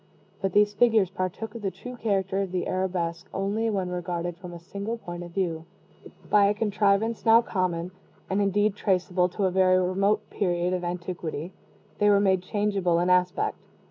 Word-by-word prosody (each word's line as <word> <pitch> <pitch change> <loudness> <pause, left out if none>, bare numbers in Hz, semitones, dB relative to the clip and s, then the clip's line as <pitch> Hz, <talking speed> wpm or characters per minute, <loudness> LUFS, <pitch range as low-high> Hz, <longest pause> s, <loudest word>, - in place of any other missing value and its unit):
But 195 0 -1
these 205 0 +4
figures 215 -4 +3
partook 190 +4 -4
of 230 - -7
the 200 - -1
true 250 +6 -9
character 195 -4 0
of 195 -2 -3
the 180 -1 -1
arabesque 180 -2 -2
only 205 +4 0
when 190 -4 -1
regarded 175 -1 -3
from 180 0 -10
a 170 - -8
single 200 +6 -5
point 175 -5 -7
of 175 - -7
view. 170 -3 -2 0.6
By 205 -1 +5
a 205 +1 +2
contrivance 210 +1 +1
now 230 +1 +6
common, 180 -4 -2 0.4
and 195 +2 0
indeed 205 +1 +2
traceable 180 -2 +1
to 195 +2 -1
a 185 - +2
very 185 0 +4
remote 195 +3 +1
period 180 -2 0
of 180 -1 -2
antiquity, 175 -2 -4 0.5
they 205 - +4
were 200 -1 +5
made 190 -2 +2
changeable 195 -3 0
in 175 +1 +2
aspect. 180 0 +1
190 Hz, 175 wpm, -26 LUFS, 180-205 Hz, 0.6 s, now